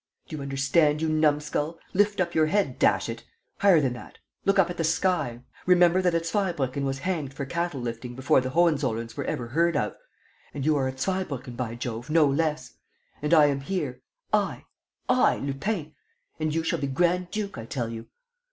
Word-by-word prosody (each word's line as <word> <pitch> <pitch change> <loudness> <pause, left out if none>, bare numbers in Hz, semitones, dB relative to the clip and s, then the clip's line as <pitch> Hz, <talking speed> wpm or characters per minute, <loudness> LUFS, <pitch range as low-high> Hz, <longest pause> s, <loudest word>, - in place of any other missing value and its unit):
Do 155 - -6
you 150 - -6
understand, 140 +3 +2
you 160 0 0
numskull? 150 +1 +1 0.2
Lift 205 +1 +2
up 170 -2 0
your 155 -1 +3
head, 180 -7 0
dash - - +3
it! - - -6 0.4
Higher 195 -5 +6
than 130 -4 0
that! 120 -3 -11 0.3
Look 195 0 +3
up 175 -2 +4
at 175 - -7
the 165 - 0
sky, 160 -7 0 0.3
remember 180 0 +5
that 180 -2 +2
a 165 - +2
Zweibrucken 165 - -1
was 135 0 -1
hanged 145 -3 -3
for 140 - -4
cattle 170 -1 -2
lifting 120 +1 -5
before 130 0 +3
the 130 - -3
Hohenzollerns 135 -8 +1
were - - -3
ever 120 -1 -3
heard 170 +3 +2
of. 105 - -1 0.6
And 140 -2 -3
you 155 0 +3
are 135 -2 +1
a - - -1
Zweibrucken, 140 -5 -3
by 120 -2 -3
Jove, 120 +2 -5
no 155 0 +5
less; 145 -2 -1 0.4
and 150 +1 -2
I 155 -3 +7
am 140 -1 +1
here, 145 -4 -3 0.3
I, - - 0 0.4
I, 255 - +4
Lupin! 155 +4 -3 0.5
And 155 0 0
you 165 - 0
shall - - -1
be 140 - -1
grand 175 +5 +1
duke, 200 - -4
I 115 - -8
tell 120 -3 -3
you! 115 0 -7
150 Hz, 195 wpm, -26 LUFS, 130-170 Hz, 0.6 s, I